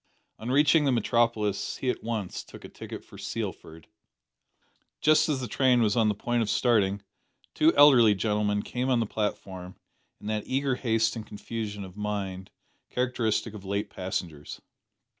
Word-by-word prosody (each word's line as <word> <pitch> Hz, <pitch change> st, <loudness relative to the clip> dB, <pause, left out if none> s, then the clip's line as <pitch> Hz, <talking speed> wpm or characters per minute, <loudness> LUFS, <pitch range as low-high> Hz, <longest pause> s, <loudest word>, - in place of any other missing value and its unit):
On 115 Hz, -, -5 dB
reaching 145 Hz, +3 st, +4 dB
the 135 Hz, -, +3 dB
metropolis 115 Hz, -3 st, 0 dB
he 130 Hz, -, 0 dB
at -, -, -7 dB
once 110 Hz, -5 st, -3 dB
took -, -, -13 dB
a -, -, -9 dB
ticket -, -, -9 dB
for -, -, -14 dB
Sealford. 80 Hz, 0 st, -6 dB, 1.1 s
Just 155 Hz, +1 st, +4 dB
as 140 Hz, -3 st, 0 dB
the 125 Hz, -, -3 dB
train 125 Hz, +1 st, +3 dB
was 105 Hz, -2 st, +2 dB
on 115 Hz, -2 st, +3 dB
the 105 Hz, -, 0 dB
point 120 Hz, +3 st, -1 dB
of 110 Hz, -, -1 dB
starting, 100 Hz, -4 st, +2 dB, 0.5 s
two 155 Hz, +1 st, +4 dB
elderly 125 Hz, -7 st, +7 dB
gentlemen 105 Hz, 0 st, 0 dB
came 125 Hz, +1 st, -2 dB
on 125 Hz, -2 st, +3 dB
the 115 Hz, -, +1 dB
platform, 95 Hz, -4 st, -4 dB, 0.4 s
in -, -, -14 dB
that 105 Hz, 0 st, -2 dB
eager 135 Hz, +1 st, 0 dB
haste 115 Hz, -2 st, +1 dB
and 110 Hz, -2 st, -7 dB
confusion 105 Hz, -1 st, -5 dB
of 95 Hz, -1 st, -11 dB
mind 100 Hz, -3 st, -4 dB, 0.4 s
characteristic 120 Hz, -3 st, -1 dB
of 105 Hz, -3 st, -9 dB
late 100 Hz, +1 st, -3 dB
passengers. 85 Hz, -5 st, -5 dB
110 Hz, 160 wpm, -27 LUFS, 100-125 Hz, 1.1 s, elderly